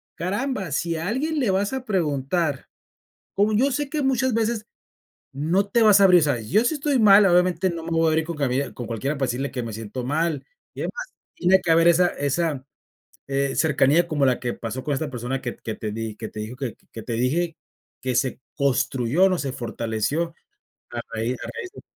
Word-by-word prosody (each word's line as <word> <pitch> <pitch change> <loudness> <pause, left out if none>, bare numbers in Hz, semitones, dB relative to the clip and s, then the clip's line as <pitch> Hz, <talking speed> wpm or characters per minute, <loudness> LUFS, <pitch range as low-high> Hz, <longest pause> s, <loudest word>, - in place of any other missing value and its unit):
caramba, 200 - -2
si 165 +4 -1
alguien 265 - -1
le 240 -8 +2
vas 200 +5 0
a 260 -1 -4
preguntar, 155 - -1 0.7
como 205 +2 +2
yo 265 +6 +3
sé 290 +1 -1
que 300 -1 -1
muchas 260 -2 +1
veces 225 -1 0 0.7
no 165 +8 +1
te 235 +3 +3
vas 210 -2 +7
a 200 - +7
abrir, 180 -2 +7
¿sabes? 125 -7 -1
Yo 215 +6 +4
sí 245 - +2
estoy 285 -2 0
mal, 205 -2 +7
obviamente 180 0 +3
no 170 -1 -5
me 170 - -5
voy 165 0 +2
a - - +4
abrir 160 0 +1
con 170 -1 -5
cuabie 140 -1 -1
con 120 - -6
cualquiera 135 +7 -2
para 135 - +1
decirle 130 +4 -2
que 125 -2 -4
me 115 - -5
siento 115 +3 -6
mal 155 +3 -1 0.3
y - - -8
además, - - -4 0.3
tiene 190 +1 +4
que 170 - -1
haber 165 +1 +5
esa 175 +1 +5
esa, 145 -2 -1 0.6
eh, 135 0 0
cercanía 150 +3 +3
como 150 -4 +1
la 125 - +2
que 120 -1 -2
pasó 115 +3 -5
con 150 - -1
esta 150 +2 -2
persona, 125 +2 -3
que 120 - -4
que 110 - -5
te 110 - -5
di 110 0 -5
que 110 - -6
te 110 - -7
dijo 110 +4 -6
que 130 -4 -4 0.2
que 115 - -7
te 120 - -4
dije 155 +8 0 0.5
que 130 0 -1
se 130 +2 0 0.2
construyó, 140 +3 +2
no 185 - +1
se 135 -3 -3
fortaleció 120 +8 -2 0.6
a 120 - -3
raíz 115 +2 -1
a - - -6
raíz 375 - -5
de - - -11
160 Hz, 210 wpm, -24 LUFS, 130-190 Hz, 0.7 s, vas